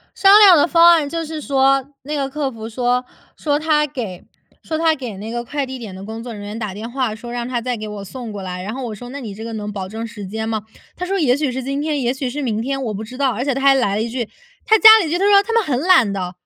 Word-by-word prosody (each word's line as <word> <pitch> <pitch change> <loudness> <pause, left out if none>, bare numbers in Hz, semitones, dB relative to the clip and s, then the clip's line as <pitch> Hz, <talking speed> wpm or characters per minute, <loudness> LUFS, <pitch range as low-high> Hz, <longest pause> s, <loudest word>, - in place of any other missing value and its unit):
商 390 - +5
量 390 -4 +9
的 295 - +4
方 340 0 +6
案 315 -4 +2
就 330 +2 -3
是 315 0 -6
说 275 -1 +2 0.2
那 295 +3 -5
个 275 -2 -1
客 280 0 -3
服 225 -2 -8
说 245 +2 0 0.3
说 290 -2 0
他 305 -1 +2
给 230 -11 -6 0.4
说 315 - -3
他 320 0 +2
给 250 -8 -7
那 210 +3 -7
个 240 +1 -3
快 285 +3 -3
递 260 0 -7
点 220 -6 -8
的 190 +1 -9
工 220 +2 -7
作 235 -1 -7
人 205 - -8
员 205 +2 -6
打 210 -4 -4
电 215 +3 -6
话， 250 -3 -1
说 235 +2 -9
让 240 0 -4
他 245 -2 -2
再 250 +1 -2
给 215 0 -6
我 205 -1 -7
送 235 +4 -8
过 205 -2 -7
来。 180 -1 -5
然 210 +4 -5
后 265 0 -5
我 225 -3 -5
说： 245 +4 -10
“那 275 +3 -7
你 225 -7 -7
这 215 - -9
个 230 0 -6
能 210 -1 -5
保 190 -2 -5
证 220 +3 -5
时 215 -3 -8
间 220 +3 -4
吗？” 220 -1 -2 0.3
他 360 - -5
说： 390 +2 -1
“也 270 -8 +3
许 285 0 -1
是 255 0 -4
今 275 +2 -2
天， 300 -1 -1
也 245 -2 0
许 265 0 -3
是 285 +4 -4
明 220 -5 -1
天， 270 +3 -2
我 220 - -2
不 210 +1 -5
知 240 +4 -9
道。” 275 -1 +1
而 235 +2 -3
且 275 0 0
他 270 - -3
还 275 0 +6
来 205 -6 +1
了 215 - 0
一 - - -2
句 240 -2 -3 0.4
他 440 - +5
加 440 +1 +10
了 365 - -1
一 - - -4
句， 345 - 0
他 385 - 0
说： 410 - +4
“他 460 - -8
们 460 - +4
很 270 -9 -1
懒 260 - +5
的！” 185 -2 -4
250 Hz, 330 characters per minute, -19 LUFS, 220-290 Hz, 0.4 s, 加